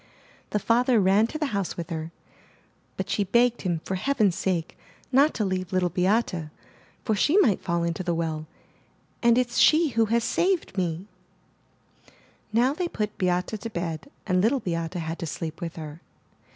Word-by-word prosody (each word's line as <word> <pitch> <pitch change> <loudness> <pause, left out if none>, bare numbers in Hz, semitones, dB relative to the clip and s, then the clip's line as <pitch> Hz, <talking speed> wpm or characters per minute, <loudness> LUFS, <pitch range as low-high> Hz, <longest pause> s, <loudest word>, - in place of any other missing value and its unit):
The - - 0
father 235 +3 +3
ran 200 +3 +4
to 310 - -5
the 310 - -1
house 200 -3 -2
with 170 -1 -6
her, 160 0 -4 0.9
but - - -3
she 205 - 0
begged 240 +4 +2
him 175 -4 -1
for - - -3
heaven's 210 -2 +1
sake 180 -4 -2 0.4
not 280 +4 +5
to 215 - 0
leave 185 -2 -2
Little 185 -1 +1
430 - - -29
THE 190 +2 +2
NURSERY 155 -2 -6
Beate, - - -30
for 220 - +1
she 295 - +3
might 230 - +4
fall 170 -2 0
into 170 +1 -2
the 175 -2 -1
well, 160 -2 -3 0.7
''And 235 0 +4
it's 245 -1 +1
she 315 0 +5
who 230 -3 +2
has 230 +2 +1
saved 360 - 0
me/* 175 -1 -2 1.5
Now 245 +5 +3
they 350 +3 -2
put 215 -9 -3
Beate 180 -1 +1 0.2
to 230 - -4
bed 170 - -4 0.2
and 185 -2 +2
Little 240 +7 +2
Beate 165 -3 -3
had 165 -1 -4
to 165 - -4
sleep 160 0 -5
with 170 -1 -5
her. 155 0 -8
190 Hz, 185 wpm, -26 LUFS, 170-235 Hz, 1.5 s, not